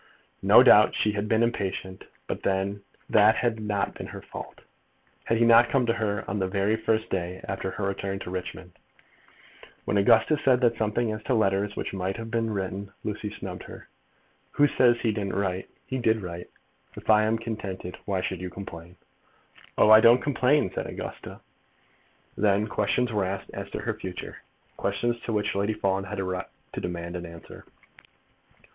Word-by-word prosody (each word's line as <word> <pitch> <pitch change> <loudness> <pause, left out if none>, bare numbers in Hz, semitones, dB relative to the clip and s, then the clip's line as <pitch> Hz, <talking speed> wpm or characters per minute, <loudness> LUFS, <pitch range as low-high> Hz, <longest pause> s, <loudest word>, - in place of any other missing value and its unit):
No - - +8
doubt - - +7
she 105 - +2
had 105 0 -3
been 110 +1 +3
impatient, 95 -4 -3 0.2
but - - -4
then 100 +1 -1 0.3
that 110 +1 +5
had 120 -1 0
been 100 -1 -2
her - - -8
fault. - - -9 0.6
Had 115 - +1
he 115 - +4
not 115 +1 +6
come 135 -3 +2
to 115 - +2
her 110 -2 -2
the 95 -3 -1
very 100 +3 +1
first 110 0 0
day 90 0 -2
after 95 0 -3
her 100 - -5
return 100 0 -2
to 95 -2 -7
Richmond? 90 0 -6 1.1
When 105 - 0
Augusta 115 +9 +4
said 130 -3 +3
something 110 +1 0
as 110 0 -5
to 130 - +1
letters 100 -1 +1
which - - -4
might 95 +1 -2
have 115 -1 -7
been 115 -1 0
written, 100 -1 -4
Lucy 105 0 -4
snubbed 95 -3 -7
her. - - -12 0.6
"Who 145 - +5
says 120 -4 +3
he 115 - +1
didn't 100 -2 -3
write? 95 -2 -2 0.2
He 130 - -3
did 110 -3 +1
write. 85 -1 -7 0.5
If - - -11
I 105 0 +6
am 110 +1 +1
contented, 100 -5 -6
why 95 -2 -1
should 90 -1 -3
you 90 - -4
complain?" 90 -2 -9 0.8
"Oh, 105 - +6
I 110 0 +10
don't 115 +2 +7
complain," 135 -5 +2
said - - -3
Augusta. - - -8 0.9
Then 105 0 +2
questions 120 +2 0
were 105 -2 +1
asked 95 +1 -5
as - - -6
to - - -5
the - - -2
future, 90 -1 -7 0.4
questions 120 0 -1
to - - -2
which 105 -1 0
Lady 100 +2 0
Fawn 95 -1 -1
had 95 - -5
a - - 0
right 95 -1 -3 0.3
to - - -4
demand 85 0 -5
an 90 -1 -5
answer. 85 0 -12
100 Hz, 175 wpm, -26 LUFS, 95-115 Hz, 1.1 s, I